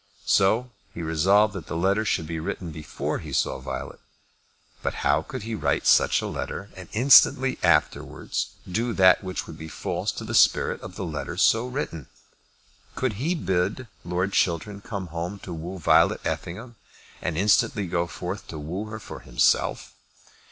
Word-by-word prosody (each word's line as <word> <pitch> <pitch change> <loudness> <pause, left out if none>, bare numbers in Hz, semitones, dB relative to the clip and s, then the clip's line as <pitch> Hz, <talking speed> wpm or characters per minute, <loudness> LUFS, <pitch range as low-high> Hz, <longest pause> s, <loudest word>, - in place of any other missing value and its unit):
So 110 +6 +3 0.2
he 85 - -5
resolved 95 +7 +3
that 90 -6 -7
the 80 - -3
letter 100 +5 +2
should 80 - 0
be 80 0 -4
written 90 0 -4
before 75 -1 -4
he - - -8
saw - - 0
Violet. - - -6 0.8
But - - -3
how - - +3
could 130 -5 -7
he 115 +1 -5
write 110 - 0
such - - +4
a - - -2
letter 100 +1 -5
and 95 -2 -10
instantly 130 +2 +6
afterwards 85 -4 +1 0.2
do 115 +6 -1
that 95 0 +5
which 95 -1 -4
would 80 -1 -11
be 80 - -7
false - - -3
to - - -6
the - - -5
spirit - - +3
of 90 - -9
a - - -4
letter 80 -4 -5
so 115 +2 +3
written? 125 - -5 0.9
Could 130 -4 -1
he 170 +6 +1
bid 100 - -1 0.2
Lord 90 +3 -1
Chiltern 95 +4 0
come 100 -5 -6
home 85 +4 -4
to 90 - -6
woo 85 +4 -6
Violet 85 - +4
Effingham, 110 +7 -5 0.4
and 85 -3 -2
instantly 105 +1 +2
go 85 -1 -1
forth 90 +6 -6
to 80 - -7
woo 85 +8 -4
her 110 0 -7
for - - -9
himself? - - +1
95 Hz, 170 wpm, -25 LUFS, 85-110 Hz, 0.9 s, instantly